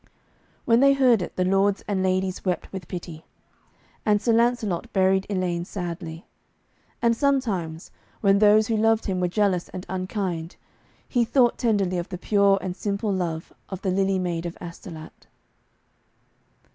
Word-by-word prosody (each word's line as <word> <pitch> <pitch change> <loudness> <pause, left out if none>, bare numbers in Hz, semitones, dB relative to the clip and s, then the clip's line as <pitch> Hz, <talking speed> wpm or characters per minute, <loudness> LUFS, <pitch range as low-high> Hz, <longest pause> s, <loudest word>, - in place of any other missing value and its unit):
When 230 0 +4
they 275 +1 +6
heard 255 -6 +4
it - - -6
the 185 - +1
lords 195 +1 +2
and 195 -2 0
ladies 185 0 0
wept 180 -1 -2
with 190 -2 -6
pity. 170 -3 -7 0.8
And 210 -1 +3
Sir 230 +2 +1
Lancelot 230 -6 +1
buried 190 0 +2
Elaine 180 -3 -1
sadly. 170 -3 -6 0.8
And 230 0 +4
sometimes 215 - -1 0.3
when 200 -1 +4
those 215 +1 +5
who 225 0 0
loved 225 +1 +2
him 185 -3 -1
were 180 - +2
jealous 185 -2 0
and 185 - -7
unkind, 185 -3 -3 0.5
he 245 -2 +2
thought 240 0 +2
tenderly 200 -6 +1
of 175 - -5
the 180 - -5
pure 200 +1 +3
and 180 -1 -4
simple 200 +1 -2
love 170 -3 -3 0.2
of 190 -1 -7
the 190 - 0
Lily 195 0 +1
Maid 175 -2 -2
of 170 - -8
Astolat. 170 -2 -10
190 Hz, 155 wpm, -24 LUFS, 180-215 Hz, 0.8 s, they